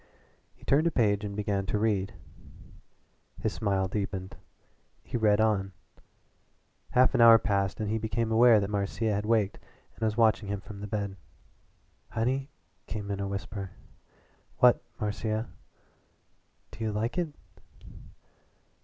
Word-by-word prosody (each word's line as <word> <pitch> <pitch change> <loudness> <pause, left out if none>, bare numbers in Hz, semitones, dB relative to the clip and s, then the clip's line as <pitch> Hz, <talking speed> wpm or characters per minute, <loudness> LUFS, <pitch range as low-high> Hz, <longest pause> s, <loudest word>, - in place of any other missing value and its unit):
He - - -23
turned 150 +4 +3
a - - +1
page 105 -6 +2
and 100 -1 -4
began 100 -2 -1
to 105 - 0
read. 105 -2 0 1.2
His - - -1
smile 95 -3 0
deepened 95 -1 -4 0.7
he - - -7
read 105 -3 +3
on. 100 -3 +1 1.2
Half 125 +1 +5
an - - +3
hour 115 -1 +10
passed 100 -3 -1
and 110 - -2
he 110 +2 -1
became 110 +1 -1
aware 115 0 +6
that 100 0 -2
Marcia 105 +2 -1
had 105 +1 -2
waked 110 -3 +1 0.3
and - - -21
was 110 0 0
watching 110 -2 +3
him 100 0 -2
from 100 0 -10
the 105 - -5
bed. 100 -2 -3 0.9
"Honey," 130 +5 -1 0.4
came 105 -2 -5
in 100 - -3
a 100 - -2
whisper. 100 0 -5 0.8
"What 125 -1 +5 0.2
Marcia?" 110 +1 -2 1.2
"Do 110 +1 -7
you 110 - 0
like 110 +9 -1
it?" 170 -4 -2
105 Hz, 140 wpm, -29 LUFS, 100-115 Hz, 1.2 s, hour